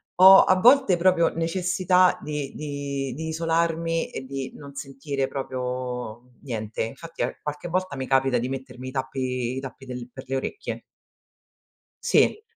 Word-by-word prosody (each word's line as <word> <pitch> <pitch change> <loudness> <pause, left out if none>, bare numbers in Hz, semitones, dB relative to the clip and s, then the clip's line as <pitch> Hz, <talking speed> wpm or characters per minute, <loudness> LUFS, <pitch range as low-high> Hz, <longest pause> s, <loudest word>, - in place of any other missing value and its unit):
ho 190 +1 +9
a 185 - +4
volte 250 -4 +6
proprio 170 -1 +4
necessità 180 +2 +2
di 150 -2 -4
di 140 -3 -4
di 160 +5 -5
isolarmi 165 0 0
e - - -5
di 135 0 -5
non 140 -1 -11
sentire 135 0 -3
proprio 125 -3 -4
niente, 110 -6 -3
infatti 165 +9 -5
a - - -3
qualche 150 +3 -5
volta 185 -4 -2
mi 130 -1 -4
capita 135 -1 +3
di 120 +1 -1
mettermi 130 -1 -6
i - - -5
tappi 130 -2 -2
i - - -1
tappi 135 0 -9
del 125 -1 -7
per 130 +2 -10
le 135 +1 -1
orecchie. 135 - -4 1.2
Sì. 430 - +3
140 Hz, 155 wpm, -25 LUFS, 130-165 Hz, 1.2 s, ho